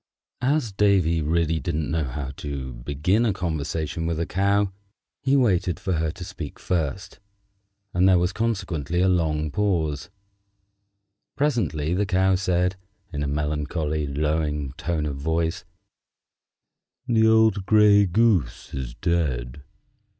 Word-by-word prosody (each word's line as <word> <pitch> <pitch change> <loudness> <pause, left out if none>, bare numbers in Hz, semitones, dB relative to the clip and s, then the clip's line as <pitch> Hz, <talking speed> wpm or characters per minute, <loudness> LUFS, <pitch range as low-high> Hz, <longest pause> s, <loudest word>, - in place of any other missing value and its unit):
As 130 -3 +1
Davy 95 -5 +2
really 80 +1 +1
didn't 75 +1 -2
know 80 -2 0
how 65 +1 -5
to 70 -3 -5
begin 75 - 0
a 115 - +2
conversation 80 -1 -3
with 85 -1 -1
a 85 - 0
Cow, 100 +2 +1 0.5
he 135 0 +2
waited 95 - +2
for 95 - -2
her 80 -1 0
to 90 0 -8
speak 90 -6 -7
first, 90 +2 -3 0.7
and 90 +2 +4
there 95 - +6
was 90 +2 +1
consequently 90 -8 -1
a 95 - +4
long 80 -4 +1
pause. 80 -8 -1 1.3
Presently 85 - 0
the 100 +2 0
Cow 95 +1 +3
said, 90 0 +1 0.4
in 75 - -3
a 70 - -1
melancholy, 75 +1 -2
lowing 75 -1 -1
tone 80 +2 -2
of 70 -2 -3
voice, 80 +3 -1 1.4
"The 110 -2 +3
old 110 -3 +3
gray 105 -2 +6
goose 90 - +1
is 65 -3 -5
dead." 75 -7 -1
85 Hz, 130 wpm, -24 LUFS, 75-95 Hz, 1.4 s, there